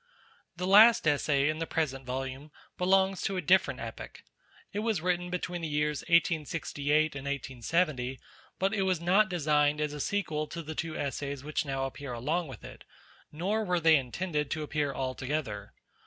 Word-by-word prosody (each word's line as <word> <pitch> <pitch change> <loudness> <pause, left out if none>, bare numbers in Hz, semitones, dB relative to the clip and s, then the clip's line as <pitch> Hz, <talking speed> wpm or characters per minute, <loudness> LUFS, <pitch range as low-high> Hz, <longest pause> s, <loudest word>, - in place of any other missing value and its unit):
The 180 - -2
last 210 0 +7
Essay 145 -1 +2
in 155 +1 -1
the 165 - -2
present 135 -5 -2
volume 135 +3 -4 0.3
belongs 190 +1 +2
to 195 - -1
a - - 0
different 185 +1 +3
epoch; - - -8 0.5
it 205 - -2
was 220 -3 0
written 180 +1 -1
between 180 -1 -3
the 165 - -2
years 150 0 0
1868 155 -2 +1
and 135 0 -6
1870, 135 0 -1 0.4
but 195 +2 +1
it 205 - 0
was 185 -3 +1
not 190 +4 +3
designed 150 -3 +2
as 150 -1 -1
a 150 - -6
sequel 155 -4 -1
to 170 +1 -6
the 155 +1 -6
two 160 0 -4
Essays 140 -1 -3
which 150 +1 -2
now 135 -1 -2
appear 135 -1 -6
along 155 +9 -1
with 130 -5 -10
it, - - -11 0.5
nor 195 +8 -1
were 180 -3 +1
they 160 -1 +6
intended 150 +3 -1
to 155 -1 -2
appear 150 -1 -1
all 130 -1 -3
together. 130 -8 -4
155 Hz, 175 wpm, -30 LUFS, 140-180 Hz, 0.5 s, last